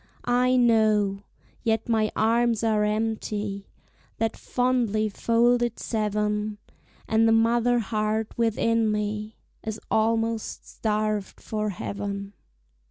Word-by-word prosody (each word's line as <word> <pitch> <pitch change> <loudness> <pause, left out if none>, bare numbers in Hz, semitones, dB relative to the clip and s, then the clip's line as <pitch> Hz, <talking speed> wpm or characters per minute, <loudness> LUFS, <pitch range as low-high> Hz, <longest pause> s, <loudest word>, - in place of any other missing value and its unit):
I 250 +1 +3
know, 215 -5 +3 0.4
yet 225 -1 0
my 220 -2 +1
arms 230 0 +2
are 215 -2 +2
empty, 210 -2 -2 0.5
That 225 -1 -1
fondly 240 -4 0
folded 235 +2 +2
seven, 210 -1 -1 0.5
And 220 +1 +3
the - - +4
mother 235 +2 +3
heart 215 0 -1
within 230 -1 +1
me 210 +1 -3 0.2
Is 220 0 -5
almost 225 0 0
starved 215 -2 -2
for 215 -1 -3
heaven. 200 +1 -5
220 Hz, 100 wpm, -25 LUFS, 210-230 Hz, 0.5 s, the